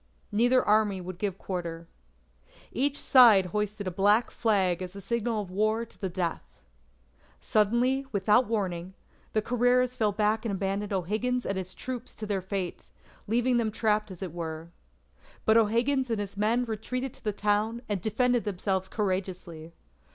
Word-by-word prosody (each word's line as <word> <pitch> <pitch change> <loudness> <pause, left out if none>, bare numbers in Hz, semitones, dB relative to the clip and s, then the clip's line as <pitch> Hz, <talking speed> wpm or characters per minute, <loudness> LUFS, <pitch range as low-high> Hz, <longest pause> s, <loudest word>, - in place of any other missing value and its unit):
Neither 245 +4 +3
Army 210 -2 +3
would 180 0 -7
give 195 -2 -2
quarter. 170 -3 -5 0.8
Each 280 +3 0
side 230 -8 +7
hoisted 210 0 -2
a 185 - -2
black 205 +6 +3
flag 190 -6 +1
as 185 +1 -6
a - - -6
signal 230 +1 -1
of 185 - -11
war 215 +4 +1
to 230 - -23
the 190 - -1
death. 170 - -4 0.8
Suddenly, 240 - +1
without 210 +4 +3
warning, 190 -4 -2 0.4
the 215 - +1
Carreras 245 +1 +2
fell 220 -4 +1
back 215 +1 +1
and 225 - -2
abandoned 195 +2 -2
O'Higgins 215 +7 -1
and 195 - -1
his 185 0 -5
troop 255 -1 -5
to 220 - -7
their 200 -2 -1
fate, 185 -1 -4 0.4
leaving 240 +3 +2
them 230 -2 +1
trapped 215 -1 0
as 185 -1 -8
it 180 -4 -6
were. 165 -1 -6 0.7
But 220 - +4
O'Higgins 235 +4 +2
and 225 -2 -1
his 200 -1 -5
men 225 +4 +1
retreated 250 +4 -3
into - - -20
the 210 - -1
town 210 +3 0
and 205 -4 -2
defended 245 +3 +1
themselves 190 -1 -1
courageously. 185 -5 -3
210 Hz, 160 wpm, -28 LUFS, 190-235 Hz, 0.8 s, side